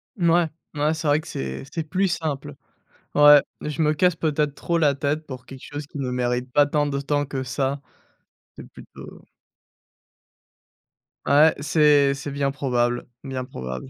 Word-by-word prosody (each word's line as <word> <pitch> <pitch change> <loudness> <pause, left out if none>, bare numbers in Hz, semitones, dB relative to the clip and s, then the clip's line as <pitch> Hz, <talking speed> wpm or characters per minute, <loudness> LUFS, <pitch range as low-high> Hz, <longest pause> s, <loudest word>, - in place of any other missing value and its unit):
Mouais, 170 -3 +3 0.3
ouais, 150 +1 +1
c'est 160 -1 -4
vrai 145 +1 +3
que 160 - -11
c'est 65 - -5
c'est 165 - -3
plus 185 +5 0
simple. 150 - -3 0.6
Ouais, 145 0 +8 0.2
je 150 +1 -3
me 150 0 +3
casse 180 +2 +2
peut-être 150 -2 0
trop 170 +3 -1
la 145 -3 +3
tête 145 +3 -2
pour 130 -2 -9
quelque 135 -1 -11
chose 145 0 -7
qui 145 - -9
ne 130 -2 -2
mérite 125 0 -1
pas 145 -1 +5
tant 145 0 0
de 140 -1 -2
temps 145 +1 0
que 135 -1 -4
ça. 135 +2 -2 0.8
C'est - - -11
plutôt - - -13 2.0
Ouais, 150 +3 +5
c'est 145 -2 +4
c'est 140 +1 -6
bien 140 0 -1
probable, 120 -3 -1 0.2
bien 130 -2 -4
probable. 65 - -7
145 Hz, 165 wpm, -23 LUFS, 135-155 Hz, 2.0 s, Ouais